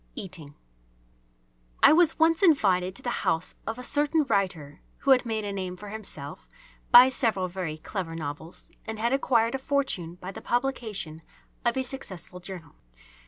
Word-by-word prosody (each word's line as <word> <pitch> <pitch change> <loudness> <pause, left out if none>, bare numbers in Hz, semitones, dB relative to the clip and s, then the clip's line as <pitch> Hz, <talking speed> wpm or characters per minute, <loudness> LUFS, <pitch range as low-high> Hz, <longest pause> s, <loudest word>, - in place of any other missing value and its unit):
EATING 165 -6 -7 1.3
I - - +9
was 330 0 +4
once 325 +2 +3
invited 190 - +3
to - - -10
the - - -2
house 165 +2 0
of 225 - -3
a 250 - -7
certain 295 +4 +2
writer 180 - -2 0.2
who 275 - +3
had 250 -2 +5
made 220 -2 -2
a 200 - -3
name 185 -2 -4
for 205 +2 -9
himself 175 -9 -8 0.4
by 250 +2 +9
several 225 -8 +1
very 175 -4 -4
clever 165 0 -5
novels 160 +1 -7 0.2
and 220 0 -4
had 235 +4 0
acquired 235 -4 +2
a 270 - -2
fortune 265 -12 -2
by 180 +1 -8
the - - -9
publication 225 -10 -3 0.4
of 240 +1 +1
a 260 - +1
successful 190 -9 -5
journal. 175 -4 -9
200 Hz, 165 wpm, -27 LUFS, 175-260 Hz, 1.3 s, I